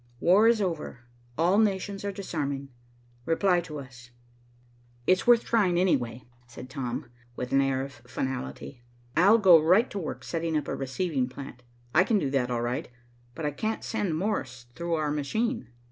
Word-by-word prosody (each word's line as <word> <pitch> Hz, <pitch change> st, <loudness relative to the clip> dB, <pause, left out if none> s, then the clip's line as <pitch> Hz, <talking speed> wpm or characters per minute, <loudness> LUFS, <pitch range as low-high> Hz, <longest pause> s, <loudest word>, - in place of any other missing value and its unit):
War 195 Hz, -, +5 dB
is 230 Hz, -3 st, +4 dB
over. 165 Hz, -8 st, -4 dB, 0.4 s
All 175 Hz, +6 st, +3 dB
nations 200 Hz, -2 st, 0 dB
are 200 Hz, -, -2 dB
disarming. 145 Hz, -8 st, -4 dB, 0.6 s
Reply 175 Hz, +2 st, +3 dB
to 155 Hz, -3 st, -8 dB
us.'" 125 Hz, -3 st, -11 dB, 1.0 s
"It's 185 Hz, -, +2 dB
worth 240 Hz, -1 st, +6 dB
trying, 190 Hz, -7 st, +2 dB
anyway," 125 Hz, -10 st, 0 dB, 0.2 s
said 125 Hz, +2 st, -11 dB
Tom, 125 Hz, -4 st, -4 dB, 0.2 s
with 125 Hz, 0 st, -5 dB
an 135 Hz, -, +4 dB
air 135 Hz, -1 st, 0 dB
of 140 Hz, -, -7 dB
finality. 120 Hz, -, -5 dB, 0.3 s
"I'll 200 Hz, +7 st, +6 dB
go 180 Hz, -7 st, +7 dB
right 185 Hz, +10 st, +4 dB
to 200 Hz, -, -3 dB
work 165 Hz, -, -5 dB
setting 165 Hz, -1 st, -1 dB
up 150 Hz, -, -3 dB
a -, -, -2 dB
receiving 135 Hz, -1 st, -1 dB
plant. 130 Hz, -1 st, -9 dB, 0.3 s
I 170 Hz, -, +6 dB
can 215 Hz, +2 st, +2 dB
do 145 Hz, -8 st, -1 dB
that, 130 Hz, -3 st, +1 dB
all 120 Hz, -1 st, -1 dB
right, 120 Hz, +1 st, -2 dB, 0.5 s
but 160 Hz, -, -4 dB
I 150 Hz, -, 0 dB
can't 220 Hz, +9 st, -3 dB
send 205 Hz, -8 st, -1 dB
Morse 130 Hz, -, -3 dB
through 170 Hz, +5 st, -2 dB
our 155 Hz, -2 st, -1 dB
machine." 220 Hz, -, -1 dB
155 Hz, 170 wpm, -27 LUFS, 130-190 Hz, 1.0 s, go